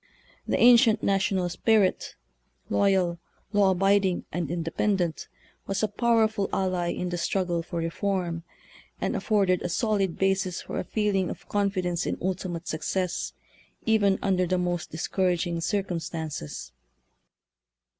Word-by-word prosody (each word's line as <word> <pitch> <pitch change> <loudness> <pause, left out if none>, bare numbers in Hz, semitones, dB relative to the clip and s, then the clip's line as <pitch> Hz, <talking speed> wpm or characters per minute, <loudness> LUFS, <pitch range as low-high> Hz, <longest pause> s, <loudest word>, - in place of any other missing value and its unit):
The - - +1
ancient 235 -2 +6
national 195 -2 +1
spirit, 210 +1 +1 0.6
loyal, 185 -4 +2 0.3
law 205 -2 +4
abiding, 195 0 +2
and 170 -3 -2
independent, 175 +1 -1 0.4
was 195 +2 -1
a - - +4
powerful 220 -1 +1
ally 185 -2 0
in 180 - -3
the 175 0 -3
struggle 175 -2 0
for 170 +1 -6
reform, 170 0 -2 0.6
and - - -1
af - - -4
forded 195 -4 +2
a 180 - -2
solid 195 -2 0
basis 190 -2 +1
for - - -5
a - - -2
feeling 205 -4 0
of - - -8
confi 200 -2 0
dence 175 0 -1
in - - -1
ultimate 180 -2 -3
success, 180 +3 -2 0.5
even 205 -3 +3
under 185 -2 +2
the 185 +1 +1
most 175 -2 -2
discouraging 175 0 -1
circumstances. 165 - -3
185 Hz, 130 wpm, -27 LUFS, 175-200 Hz, 0.6 s, ancient